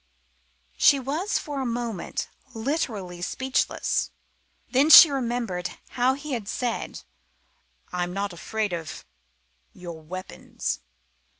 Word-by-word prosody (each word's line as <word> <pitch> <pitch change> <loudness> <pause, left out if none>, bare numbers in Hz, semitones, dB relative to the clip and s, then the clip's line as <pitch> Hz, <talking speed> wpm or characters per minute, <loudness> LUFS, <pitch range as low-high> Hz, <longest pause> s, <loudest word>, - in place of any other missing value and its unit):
She 280 - +6
was 305 - -1
for 290 -3 -4
the 265 - -1
moment 235 -5 -3 0.3
literally 220 - -2
speechless. 260 +7 0 0.6
Then 275 +4 +4
she 320 -1 +12
remembered 235 -9 -2
how 255 +1 +2
he 290 +2 -7
had 230 -6 -3
said: 240 +1 -3 0.9
"I 180 - -1
am 175 0 -1
not 200 0 -2
afraid 210 +3 -2
of 165 -2 -6 0.7
your 170 -3 -9
weapons." 185 +4 -5
230 Hz, 110 wpm, -26 LUFS, 180-265 Hz, 0.9 s, she